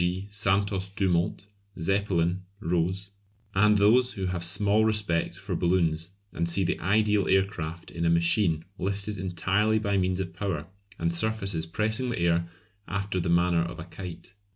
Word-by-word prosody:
g._ 95 +3 -2
Santos 100 -2 +1
Dumont, 95 -2 0 0.3
Zeppelin, 90 -1 +1 0.2
Roze; 90 +2 -1 0.4
and 105 +2 +4
those 120 +5 +4
who 95 - -3
have 90 -2 -2
small 105 +5 +2
respect 105 -7 0
for 95 0 -5
balloons, 85 -1 +1 0.2
and 85 +1 -1
see 95 +3 +2
the 90 - -1
ideal 105 +2 +2
air 95 0 +4
craft 85 -4 -7
in 85 - -4
a 85 - +3
machine 85 -1 +2
lifted 100 +2 -3
entirely 95 +4 +1
by 100 -2 +1
means 90 0 0
of 90 -3 -4
power 90 -5 -3 0.3
and 85 0 0
surfaces 100 -4 0
pressing 110 +8 0
the 120 - -2
air 85 0 +1 0.4
after 100 +1 -2
the 85 0 -1
manner 85 0 +3
of 85 +1 -4
a 80 - -6
kite. 90 0 -9
95 Hz, 160 wpm, -27 LUFS, 85-100 Hz, 0.4 s, and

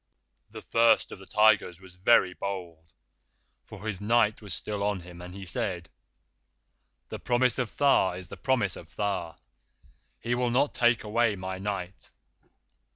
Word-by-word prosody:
"The - - -10
First 115 -1 +3
of - - -9
the 95 - -14
Tigers 105 -5 +3
was 95 -1 -14
very 95 0 +4
bold, 85 -5 -6 0.7
for 105 +4 -11
his 100 -3 -4
Night 110 0 +2
was 105 -2 -9
still 100 +3 -4
on 100 -2 -1
him, 85 0 -12
and 90 +1 -9
he 100 -1 -8
said: 85 -1 -3 1.2
'The - - -6
Promise 125 +1 +1
of 125 -3 -3
Tha 135 -10 +4
is 90 -1 -9
the - - -7
Promise 100 0 0
of 85 0 -13
Tha. 95 -5 -2 0.8
He 120 +2 -2
will 125 0 +1
not 130 +4 +2
take 120 -1 +2
away 110 0 +1
my 95 0 -5
Night? 95 -4 -5
100 Hz, 155 wpm, -28 LUFS, 90-115 Hz, 1.2 s, very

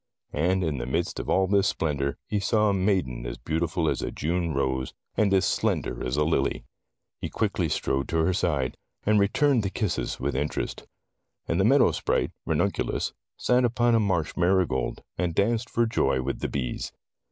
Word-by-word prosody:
And 90 +5 +1
in 75 -5 -1
the - - -4
midst 85 +6 -1
of - - -5
all 95 - +3
this 100 +1 +3
splendor, 70 -3 -1
he 105 - 0
saw 105 +2 +2
a - - +2
maiden 95 -11 0
as - - -5
beautiful 80 +1 -1
as - - 0
a - - -2
June 85 +2 -1
rose, 65 -2 -1 0.2
and 105 -2 +2
as 95 -1 +4
slender - - 0
as 65 +3 -2
a 75 - +3
lily. 75 -3 0 0.6
He - - -4
quickly - - 0
strode 65 0 -1
to 80 - 0
her 95 - +2
side, 70 -9 0 0.3
and 105 0 +4
returned 125 +6 +3
the 100 - -1
kisses 100 -4 -2
with 70 0 -2
interest. 75 +3 -3 0.6
And 85 - 0
the 95 - +4
Meadow 135 +4 +5
Sprite, - - 0 0.2
Ran - - +2
unculus, - - -1 0.2
sat 125 0 +3
upon 120 0 +2
a 115 - +5
marsh 90 -7 0
marigold, 90 +1 +1 0.2
and 85 -2 0
danced 115 +3 +1
for 120 - +2
joy 110 -11 +1
with 70 - -3
the - - -2
bees. 65 -3 -3
90 Hz, 185 wpm, -26 LUFS, 70-100 Hz, 0.6 s, Meadow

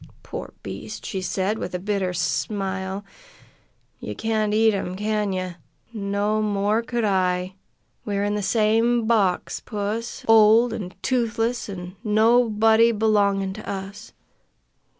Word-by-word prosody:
"Poor - - -7
beast!" - - -7
she 190 - -3
said, 195 +3 -1
with - - -4
a - - +1
bitter 195 -1 -1
smile. 190 +3 -2 0.9
"Ye - - -6
can't 220 -1 0
eat 220 +1 +4
'em, 185 -2 -3
can 210 0 -1
ye? 185 -1 -3 0.4
No 205 0 -1
more 210 +1 +1
could 235 0 -2
I! 185 -2 +1 0.5
We're 200 -1 -1
in 205 0 0
the 210 - -1
same 225 +3 +2
box, 205 -6 +1
puss! 215 +2 -4
Old, 225 +1 +6
an' 185 -5 -5
toothless, 235 -2 0
an' 180 -1 -7
nobody 225 0 +4
belongin' 200 -3 +1
to 215 - -8
us. 200 +2 -6
210 Hz, 130 wpm, -23 LUFS, 195-225 Hz, 0.9 s, Old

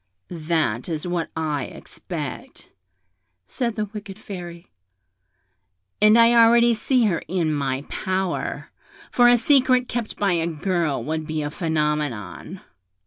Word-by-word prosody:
'That 160 -7 -1
is 160 -1 -3
what 175 -2 -2
I 150 -4 -1
expect,' - - -8 0.8
said 235 - -3
the 215 - -1
wicked 205 -1 -9
Fairy; 175 -5 -9 1.3
'and 215 +2 +6
I 230 0 +6
already 235 0 +6
see 245 +2 +1
her 180 -6 0
in 165 -2 0
my 135 -2 -2
power; 185 +2 -3 0.4
for 245 -1 +5
a 245 - +6
secret 255 -1 +3
kept 235 -3 -4
by 200 -3 +1
a 165 -1 0
girl 170 -2 -1
would 155 0 -3
be 155 -1 -2
a 145 - -4
phenomenon.' 150 - -2
175 Hz, 130 wpm, -23 LUFS, 155-220 Hz, 1.3 s, and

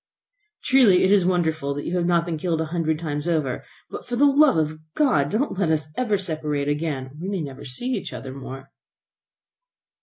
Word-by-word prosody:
"Truly 245 -9 +5
it 190 - +3
is 195 -3 +4
wonderful 160 -6 0
that 145 - -5
you 175 - -2
have 175 -1 +1
not 170 -1 +2
been 165 -3 -3
killed 165 -1 -1
a 160 - 0
hundred 160 -2 0
times 150 -1 -4
over. 155 -7 -1 0.3
But, - - -7
for 245 - -2
the 280 +4 +4
love 285 - +5
of 155 0 -1 0.2
God, 150 - +2
don't 215 - -1
let 185 -5 +1
us 155 -2 0
ever 225 -5 +1
separate 155 -6 -2
again, 145 -2 -1
or 130 - -14
we 185 - -4
many 195 -5 -2
never 135 -2 -8
see 135 - -3
each - - -3
other 130 -1 -7
more." 135 0 -9
160 Hz, 205 wpm, -23 LUFS, 145-190 Hz, 0.3 s, Truly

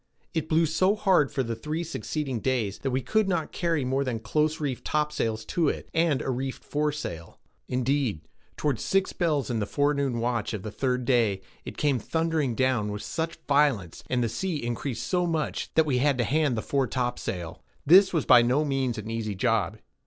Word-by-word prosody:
It 160 -2 -2
blew 165 +1 +4
so 185 +6 +2
hard 185 - +3
for 135 - 0
the 115 -1 -3
three 155 +8 -3
succeeding 150 -5 -3
days, 115 -6 -1
that 135 - -2
we 130 +1 0
could 220 -2 +1
not 170 -4 -1
carry 165 -6 0
more 135 +2 +1
than 125 -4 -2
close 150 +8 0
reefed 140 -5 -3
topsails 115 -8 -1
to 165 +2 +1
it, - - -5
and 160 -4 +2
a 135 - -1
reefed 130 +1 -4
foresail. 145 - -3 0.3
Indeed, 125 - 0 0.4
toward 140 -7 0
six 195 0 +1
bells 150 -8 0
in 115 - 0
the 105 - -2
forenoon 140 -2 +1
watch 115 -2 -1
of 100 - -7
the 110 - -5
third 125 +1 -1
day, 115 -6 +2 0.2
it - - -7
came 140 -4 +2
thundering 160 -1 0
down 125 -5 +1
with 105 0 -5
such 165 0 -3
violence, 140 - +2
and 125 -1 +1
the - - +1
sea 175 - -2
increased 120 +2 -3
so 180 -1 +1
much, 160 -2 -2
that 160 - +5
we 130 -4 +1
had 140 0 +2
to 120 - +2
hand 145 -2 +1
the 110 - -2
fore 135 -2 0
topsail. 110 -9 -3 0.2
This 190 +6 +7
was 160 -5 0
by 120 - +8
no 130 +6 +2
means 135 -4 -1
an 110 +1 -5
easy 110 -3 -3
job. 110 0 +1
135 Hz, 195 wpm, -27 LUFS, 115-155 Hz, 0.4 s, by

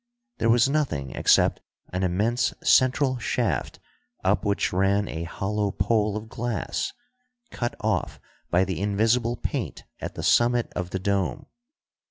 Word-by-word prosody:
There 115 - +2
was 120 +2 +5
nothing 135 - -1
except - - +3 0.3
an 90 - -1
immense 105 +7 +1
central 130 0 +3
shaft, 100 - -1 0.4
up - - +2
which 100 -2 0
ran 100 +2 +2
a 80 +1 -4
hollow 105 +4 -2
pole 105 +2 +1
of 110 +1 -7
glass, 115 -3 -3 0.6
cut 120 -1 -3
off - - -1 0.3
by 90 +2 +3
the 95 -2 -3
invisible 115 +4 +2
paint - - -4 0.2
at - - -6
the - - -5
summit 120 0 +3
of 90 0 -3
the 95 - -2
dome. 100 +7 -1
105 Hz, 140 wpm, -25 LUFS, 95-120 Hz, 0.6 s, was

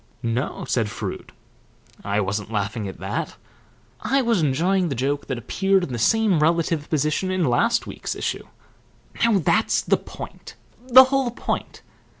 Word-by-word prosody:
'No,' 120 +4 -2
said 115 -4 0
Froude. - - -6 0.7
'I 100 +1 0
wasn't 100 +2 -3
laughing 105 0 -2
at 95 - -8
that. - - -4 0.6
I 270 +1 +1
was 230 -6 +2
enjoying 170 +6 +1
the 135 - -2
joke 140 +4 -2
that 130 - -3
appeared 195 - +1
in 135 - -4
the 120 - -3
same 210 - +3
relative 165 -1 +1
position 155 +4 0
in 185 -2 0
last 130 - +2
week's - - -5
issue.' - - -4 0.8
Now 230 -3 +4
that's 205 +6 +2
the - - +2
point - - -10 0.3
the 260 +1 +10
whole 265 -1 0
point. 240 - -4
155 Hz, 150 wpm, -23 LUFS, 120-200 Hz, 0.8 s, the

